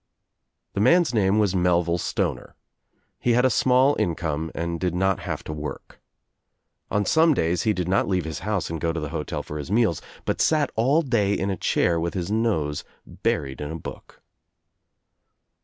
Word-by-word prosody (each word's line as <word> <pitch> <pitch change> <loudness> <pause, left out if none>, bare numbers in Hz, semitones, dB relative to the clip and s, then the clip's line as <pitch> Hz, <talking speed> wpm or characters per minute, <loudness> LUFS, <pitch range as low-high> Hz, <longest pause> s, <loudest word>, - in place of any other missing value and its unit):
The - - -2
man's 165 - +4
name 100 -2 +3
was 105 -3 +2
Melville 90 -1 +2
Stoner, - - -2 0.6
He 120 - +2
had 125 +2 +3
a 130 - +4
small 130 +5 +4
income 80 -2 -1
and 85 0 -3
did 90 -2 -1
not 95 +1 +1
have - - -5
to 75 - -5
work. 75 0 -7 0.9
On 105 0 0
some 160 -1 +4
days 85 -3 +1
he - - +4
did 90 -3 -2
not 95 +2 +2
leave 90 -4 0
his 80 - -4
house 100 -3 -2
and 80 - -4
go 85 - +1
to 85 - -3
the 75 -2 -4
hotel - - -4
for 75 - -6
his 70 - -6
meals 105 -6 +2 0.2
but - - -1
sat 150 -3 +2
all 135 +9 +3
day 110 -7 +1
in 95 +1 -1
a - - -1
chair 85 0 +1
with 85 +3 -2
his 90 +1 -3
nose 100 -10 0 0.2
buried 70 -2 -2
in 75 - -4
a 80 - -4
book. 80 - -10
95 Hz, 185 wpm, -24 LUFS, 80-115 Hz, 0.9 s, man's